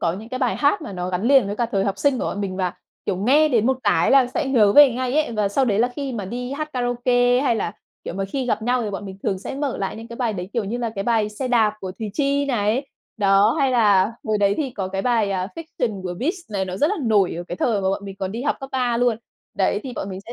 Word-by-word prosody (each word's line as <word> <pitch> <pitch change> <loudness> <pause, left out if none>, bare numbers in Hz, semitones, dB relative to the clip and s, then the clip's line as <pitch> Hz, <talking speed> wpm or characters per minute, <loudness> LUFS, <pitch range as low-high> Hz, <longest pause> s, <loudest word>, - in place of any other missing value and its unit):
có 170 - +1
những 210 +5 -8
cái 255 - -4
bài 250 -2 0
hát 300 +5 +2
mà 210 - -7
nó 180 -1 -4
gắn 180 +1 -2
liền 260 -1 +5
với 205 +1 -4
cả 240 - 0
thời 195 -2 +1
học 200 -1 -2
sinh 280 -3 +2
của - - -2
bọn 205 - -3
mình, 190 -2 -3
và, 185 -2 -1 0.3
kiểu, 195 - 0
nghe 275 +11 +4
đến 235 -6 +2
một 260 0 +1
cái - - +3
là 270 -2 +6
sẽ 260 +4 -2
nhớ 220 -7 +4
về 290 +1 +8
ngay 255 +1 -2
ấy. 310 -6 +1
Và 210 -2 0
sau 265 +7 +1
đấy 210 -5 +1
là 240 +2 +3
khi 275 -2 -3
mà 215 -5 -4
đi 245 +6 -5
hát 305 +2 -4
karaoke 245 0 +2
hay 250 -5 +2
là, 185 - -2 0.3
kiểu, - - -5
mà 195 +1 -2
khi 255 +7 -3
gặp 215 -3 0
nhau, 245 +2 +1
thì 215 - -3
bọn 200 +1 -5
mình 190 0 -9
thường 190 - -1
sẽ 190 - -6
mở 275 -2 -2
lại 195 +1 -3
những 225 +1 -9
cái 235 - -8
bài 235 -3 0
đấy 185 -1 -6
kiểu 230 -3 -1
như 225 +5 -3
là 235 -2 -2
cái 195 -1 -3
bài 225 -2 +2
"Xe 225 +5 -4
đạp" 225 -4 +3
của 185 -1 -5
Thùy 220 -2 -4
Chi 280 +1 +1
này. 240 +1 0 0.3
Đó, 200 +1 +4
hay 270 -1 +2
là 210 -4 +4
hồi 215 -1 0
đấy 200 0 +3
thì 285 -4 -2
có 195 -6 -4
cái 195 +1 -3
bài, 225 -4 +1
à, 185 -1 -2
"Fiction" 245 -11 -4
của 180 -1 -4
Beast 340 - -3
này, 195 -2 -1
nó 185 0 -5
rất 295 - +2
là 415 - -1
nổi 210 -6 +2
ở 170 - -4
cái 175 - -4
thời 220 -4 +1
mà 190 - 0
bọn 195 +1 -2
mình 195 -1 -7
còn 190 -1 -3
đi 230 +3 -4
học 290 - 0
cấp 270 - -6
3 250 -2 +1
luôn. 240 -1 +2 0.4
Đấy, - - +1
thì 260 - -6
bọn 195 - -4
mình 190 -1 -6
sẽ 230 - -10
230 Hz, 300 wpm, -22 LUFS, 195-255 Hz, 0.4 s, về